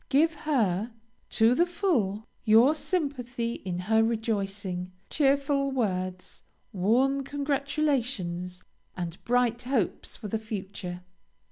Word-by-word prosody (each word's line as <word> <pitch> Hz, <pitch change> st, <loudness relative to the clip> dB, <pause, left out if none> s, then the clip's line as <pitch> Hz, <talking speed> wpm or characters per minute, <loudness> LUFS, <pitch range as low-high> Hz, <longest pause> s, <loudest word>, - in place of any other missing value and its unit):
Give 320 Hz, +4 st, +4 dB
her, 235 Hz, -, 0 dB, 0.4 s
to 225 Hz, +2 st, +4 dB
the 345 Hz, +7 st, +3 dB
full, 250 Hz, -, 0 dB, 0.2 s
your 230 Hz, +7 st, +6 dB
sympathy 255 Hz, -8 st, -2 dB
in 180 Hz, -2 st, -3 dB
her 220 Hz, +4 st, +3 dB
rejoicing, 200 Hz, -5 st, -2 dB, 0.2 s
cheerful 280 Hz, -1 st, +2 dB
words, 185 Hz, -7 st, -2 dB, 0.3 s
warm 255 Hz, +9 st, +2 dB
congratulations, 275 Hz, -, -1 dB, 0.3 s
and 175 Hz, -1 st, -5 dB
bright 240 Hz, -1 st, +2 dB
hopes 245 Hz, -6 st, -1 dB
for 215 Hz, -, -6 dB
the 220 Hz, +2 st, -1 dB
future. 190 Hz, -4 st, -6 dB
230 Hz, 105 wpm, -28 LUFS, 195-275 Hz, 0.4 s, your